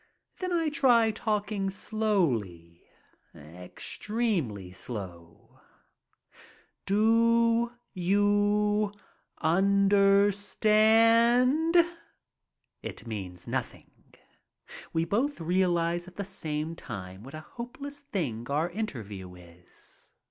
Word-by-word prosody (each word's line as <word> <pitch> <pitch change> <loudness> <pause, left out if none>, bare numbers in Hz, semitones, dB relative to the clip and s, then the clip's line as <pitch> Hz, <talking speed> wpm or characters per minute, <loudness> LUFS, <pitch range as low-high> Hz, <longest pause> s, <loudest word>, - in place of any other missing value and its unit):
Then 365 -1 -3
I 330 -3 +1
try 240 -6 +4
talking 210 -2 -2
slowly, 130 - -1 0.5
extremely 105 - -4
slow. 90 -4 -9 1.3
Do 230 +3 +3
— 235 - -49
^you 205 +2 +2 0.2
— - - -45
understand? 215 - +4 0.6
" - - -49
It - - -8
means 95 -6 -7
nothing. - - -6 0.8
We 165 0 0
both 255 +9 -1
realize 175 0 0
at 185 - -13
the 200 - -4
same 160 -3 -4
time 95 - -8
what 135 +5 -10
a 155 - -7
hopeless 275 - -9
thing 160 - -4
our 155 +5 0
interview 105 - -6
is. 90 0 -17
195 Hz, 90 wpm, -28 LUFS, -, 1.3 s, try